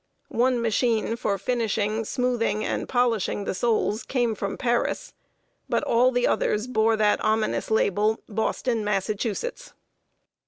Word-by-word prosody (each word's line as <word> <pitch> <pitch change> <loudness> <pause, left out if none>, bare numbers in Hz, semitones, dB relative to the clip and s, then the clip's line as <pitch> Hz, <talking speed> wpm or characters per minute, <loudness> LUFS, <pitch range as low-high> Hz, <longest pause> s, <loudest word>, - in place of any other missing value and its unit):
One 250 +1 +2
machine 230 0 +1
for 205 -4 -1
finishing, 220 0 -1
smoothing, 240 -3 0
and - - -3
polishing 230 -5 +1
the - - -2
soles 220 +1 0
came 245 -4 0
from 200 -1 -4
Paris; 245 - -1 0.6
but - - +1
all 245 +2 +4
the 245 -1 +1
others 210 +2 +1
bore 225 -2 +2
that 210 -1 +2
ominous 215 0 0
label, 215 0 +2
"Boston, 225 +2 -1
Massachusetts!" 215 - -2
225 Hz, 125 wpm, -25 LUFS, 210-245 Hz, 0.6 s, all